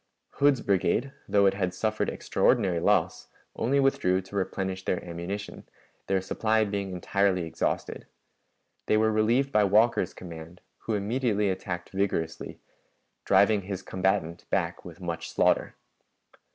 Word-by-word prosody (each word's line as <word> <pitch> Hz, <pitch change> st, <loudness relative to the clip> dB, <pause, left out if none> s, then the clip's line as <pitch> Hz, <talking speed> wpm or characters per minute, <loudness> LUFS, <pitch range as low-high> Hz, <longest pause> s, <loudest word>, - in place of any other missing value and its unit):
Hood's 140 Hz, -2 st, +3 dB
brigade, 100 Hz, +7 st, +1 dB, 0.2 s
though 100 Hz, -1 st, +4 dB
it 95 Hz, -, +4 dB
had 95 Hz, -2 st, -2 dB
suffered 110 Hz, +2 st, -1 dB
extraordinary 95 Hz, -9 st, +1 dB
loss, -, -, +1 dB, 0.3 s
only 135 Hz, +5 st, +1 dB
withdrew 95 Hz, -9 st, +2 dB
to 95 Hz, +2 st, -12 dB
replenish 95 Hz, -1 st, -2 dB
their 90 Hz, -, -2 dB
ammunition, 90 Hz, +4 st, -6 dB, 0.4 s
their 95 Hz, -1 st, +1 dB
supply 110 Hz, +3 st, +1 dB
being 100 Hz, -1 st, -3 dB
entirely 95 Hz, 0 st, +1 dB
exhausted. 80 Hz, -, -3 dB, 0.8 s
They 110 Hz, -, +3 dB
were 110 Hz, 0 st, +3 dB
relieved 115 Hz, +6 st, +2 dB
by 105 Hz, -4 st, +4 dB
Walker's 105 Hz, -1 st, +3 dB
command, 85 Hz, 0 st, -10 dB, 0.2 s
who 110 Hz, -, -2 dB
immediately 105 Hz, -1 st, 0 dB
attacked 90 Hz, -1 st, -5 dB
vigorously, 95 Hz, -4 st, -2 dB, 0.7 s
driving 100 Hz, 0 st, +4 dB
his 95 Hz, 0 st, -6 dB
combatant 95 Hz, -3 st, -1 dB
back -, -, -1 dB
with -, -, -11 dB
much 85 Hz, -1 st, -4 dB
slaughter. -, -, +1 dB
100 Hz, 130 wpm, -27 LUFS, 90-110 Hz, 0.8 s, though